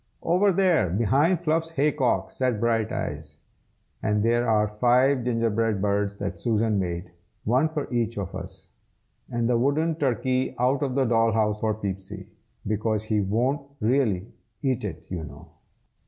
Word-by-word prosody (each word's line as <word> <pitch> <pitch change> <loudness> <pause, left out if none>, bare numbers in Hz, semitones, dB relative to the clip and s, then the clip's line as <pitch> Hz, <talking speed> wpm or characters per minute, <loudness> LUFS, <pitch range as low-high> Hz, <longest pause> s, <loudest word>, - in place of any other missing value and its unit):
"Over 185 +4 +3
there, 175 - +3
behind 140 - +2
Fluff's 165 0 +1
hay 150 -1 +1
cock," 130 -5 0
said 125 -4 -1
Brighteyes. 110 - -2 0.6
"And 105 -1 +1
there 120 +1 +2
are 105 -1 +3
five 125 +5 +3
gingerbread 115 -3 0
birds 100 0 0
that 100 -3 -5
Susan 110 0 +1
made, 90 0 -3 0.3
one 130 +8 +2
for 150 -2 -3
each 115 -1 -1
of 95 -4 -4
us, - - -8 0.6
and 120 -1 -1
the 120 -1 +2
wooden 150 +6 +1
turkey 130 -3 0
out 130 +3 +1
of 135 -3 -1
the 135 -1 +2
doll 115 -1 +3
house 105 -1 +1
for 110 -1 0
Peepsy, 95 -3 -6 0.3
because 110 0 -1
he 110 -1 0
won't 120 +9 0 0.2
really 110 -5 +1 0.4
eat 130 -5 0
it, 105 - -6
you 85 -3 -3
know. 75 -1 -11
115 Hz, 155 wpm, -25 LUFS, 105-135 Hz, 0.6 s, Over